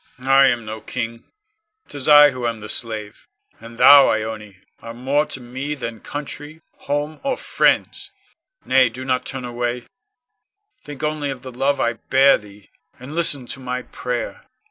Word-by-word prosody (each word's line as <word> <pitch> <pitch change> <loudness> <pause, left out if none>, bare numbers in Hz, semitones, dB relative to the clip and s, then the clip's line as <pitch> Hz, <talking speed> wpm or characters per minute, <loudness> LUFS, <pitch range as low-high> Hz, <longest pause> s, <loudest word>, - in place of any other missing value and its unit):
Con. 125 +1 -12
I 135 0 +6
am 120 -3 0
no 110 0 -7
king, 115 0 -5 0.6
'tis 140 -2 -7
I 145 -1 +8
who 125 -2 -3
am 115 -1 -3
the 105 0 -9
slave, 110 -4 -4 0.3
and 115 +1 -12
thou, 140 +2 +8
Ione, 110 -3 -4 0.2
are 115 0 -9
more 140 +5 0
to - - -6
me 130 +4 -5
than 115 -5 -6
country, 145 +3 -8 0.3
home, 145 +2 -2
or 275 -1 -2
friends. - - 0 0.6
Nay, 130 -2 +4
do 130 +3 -8
not 130 -1 -1
turn 130 -2 -5
away, 120 0 -3 1.0
think 145 -1 -9
only 150 -1 -2
of 135 -2 -6
the 130 - -8
love 140 +3 0
I 120 - +1
bear 135 +4 +3
thee, 105 -1 -17 0.3
and 130 +4 -9
listen 155 -6 +2
to - - -11
my 125 -1 -4
prayer. 125 - -5
125 Hz, 165 wpm, -20 LUFS, 115-140 Hz, 1.0 s, I